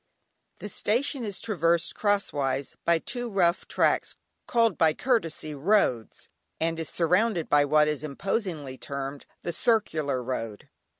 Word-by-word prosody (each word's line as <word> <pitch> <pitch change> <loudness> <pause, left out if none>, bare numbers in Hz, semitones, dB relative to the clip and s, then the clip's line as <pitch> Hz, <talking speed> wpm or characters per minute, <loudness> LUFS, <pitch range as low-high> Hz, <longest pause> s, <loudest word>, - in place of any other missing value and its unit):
The - - -7
Station 240 +6 0
is 205 -4 -3
traversed 170 -6 +1
crosswise 140 -10 0
by 170 0 +4
two 245 +8 -4
rough 180 -4 +1
tracks - - +1 0.3
called 230 -5 +3
by 160 -2 +3
courtesy 165 -11 -1
roads, 145 - +1 0.3
and 165 0 -1
is 165 - -2
surrounded 180 +1 +1
by 145 -1 +5
what 150 +1 +4
is 150 0 -2
imposingly 155 - -3
termed 140 0 -5 0.2
"The 175 - -2
Circular 155 - +1
Road." 115 -4 -5
165 Hz, 130 wpm, -27 LUFS, 145-210 Hz, 0.3 s, by